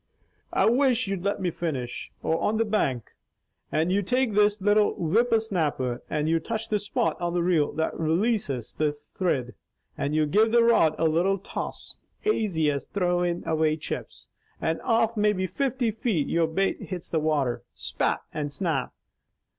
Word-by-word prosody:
"I - - +3
wish 255 0 +3
you'd 195 -2 -3
let 200 0 0
me 180 -2 -1
finish! 140 -8 -4
or 160 - 0
on 215 - +1
the 225 - +2
bank, 140 - -1 0.6
and 160 +3 +1
you 200 +2 +2
take 250 +3 +1
this 210 0 +3
little 205 +2 +3
whipper 225 +8 +2
snapper, 150 - -1
and 150 0 -1
you 165 +1 +2
touch 225 +6 -4
the 210 - +1
spot 180 -5 -1
on 175 0 -1
the 175 - +1
reel 170 -4 +2
that 160 0 -1
relases 165 - 0
the 150 -1 +1
thrid, 145 -4 -2 0.4
and 145 +2 -2
you 155 0 +3
give 215 +9 +3
the 235 0 +6
rod 225 -10 +4
a 165 - +1
little 175 +5 +2
toss, 195 - -6 0.3
aisy 190 - +1
as 140 -1 -4
throwin' 175 -2 0
away 155 -1 +2
chips, - - -7 0.3
and 160 0 -1
off 230 -1 +2
maybe 210 -3 +2
fifty 255 +2 -1
feet 215 - -1
your 165 -1 +2
bait 190 +5 0
hits 180 -3 -6
the 160 - 0
water, 150 -5 0
'spat!' - - -1
and 145 -1 -3
'snap!' 170 +1 -2
175 Hz, 170 wpm, -26 LUFS, 155-215 Hz, 0.6 s, the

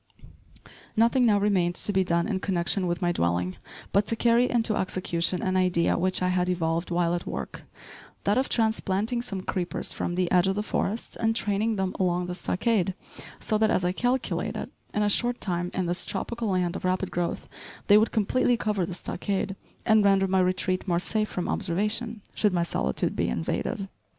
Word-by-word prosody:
Nothing 235 +2 +4
now 205 -2 +4
remained 185 -4 +1
to 205 - +1
be 190 0 +3
done 170 -1 +1
in 200 -4 -1
connection 185 0 0
with 175 +1 -2
my 175 - +2
dwelling, 90 - -1 0.3
but 200 +1 +2
to 230 - +1
carry 235 +2 +3
into 230 -2 +2
execution 180 -1 -1
an 185 0 0
idea 180 -2 +2
which 185 +1 0
I 180 - +2
had 180 0 +1
evolved 170 -1 -1
while 170 -1 +1
at 175 - -3
work, - - -6 0.6
that 205 - +2
of 260 +1 +1
transplanting 220 0 0
some 195 -6 -4
creepers 180 -1 -3
from 175 - -3
the 180 -1 0
edge 180 0 +4
of 190 - +1
the 210 - -1
forest 215 +1 -2
and 225 0 +1
training 215 +1 0
them 190 -2 -1
along 180 -1 +1
the 180 - -4
stockade, 190 0 0 0.4
so 215 -2 0
that, 220 0 +3
as 185 - +1
I 180 - +2
calculated, 245 +6 -1 0.2
in 210 - 0
a - - +2
short 240 +4 +3
time, 175 -2 -2
in 185 - -1
this 175 +1 -1
tropical 235 -1 -3
land 180 -2 0
of - - -6
rapid 185 +1 0
growth, 175 -1 -2 0.4
they 205 0 +7
would 220 - +1
completely 240 +3 +2
cover 210 -6 -1
the 180 - -5
stockade, 195 +1 -3 0.3
and 220 -2 +5
render 195 -1 +4
my 190 0 +2
retreat 185 +1 0
more 175 -2 +2
safe 215 +4 0
from 180 - -3
observation, 210 +5 -1
should 210 -3 +2
my 175 -1 +2
solitude 65 - -1
be - - 0
invaded. 80 - -2
190 Hz, 190 wpm, -26 LUFS, 175-215 Hz, 0.6 s, they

